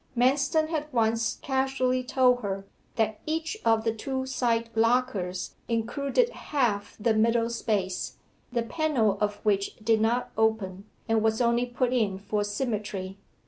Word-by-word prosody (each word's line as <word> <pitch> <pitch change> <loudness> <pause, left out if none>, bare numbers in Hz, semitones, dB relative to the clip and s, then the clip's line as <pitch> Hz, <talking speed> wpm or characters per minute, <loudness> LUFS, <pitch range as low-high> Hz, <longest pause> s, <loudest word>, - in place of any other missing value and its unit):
Manston 275 +5 +3
had 305 -2 -3
once 225 -1 +1
casually 265 -1 +1
told 250 -1 +3
her 195 -2 -3 0.3
that 220 -1 0
each 320 +4 -1
of 225 -1 +3
the 225 -1 +1
two 260 +3 -3
side 235 -3 0
lockers 225 -6 +1
included 280 - +1
half 230 - -1
the 220 +2 +2
middle 230 +1 +2
space, 200 -5 -2 0.3
the 240 -1 0
panel 255 -7 +1
of 210 0 +1
which 200 -1 +1
did 220 0 +1
not 235 +3 +1
open, 210 -3 0 0.2
and 225 -1 +2
was 220 0 +1
only 240 0 +2
put 245 +1 0
in 210 -6 +1
for 205 +1 -1
symmetry. 205 -3 -3
230 Hz, 140 wpm, -27 LUFS, 210-255 Hz, 0.3 s, Manston